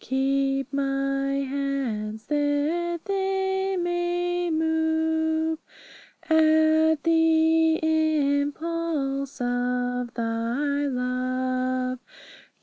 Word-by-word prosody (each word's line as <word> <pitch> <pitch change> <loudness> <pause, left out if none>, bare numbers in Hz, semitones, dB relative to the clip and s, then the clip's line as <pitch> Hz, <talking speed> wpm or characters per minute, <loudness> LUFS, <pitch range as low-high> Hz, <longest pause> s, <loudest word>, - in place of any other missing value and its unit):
Keep 270 +1 0
my 275 0 0 0.2
hands, 250 -6 -3
that 300 +4 0
they 385 -1 -1
may 350 0 -1
move 320 0 0 0.6
At 315 -1 +3
the 325 0 +3 0.6
impulse 285 -3 -3
of 245 0 -1
Thy 240 +5 -1
love. 255 0 -1
290 Hz, 60 wpm, -25 LUFS, 255-320 Hz, 0.6 s, At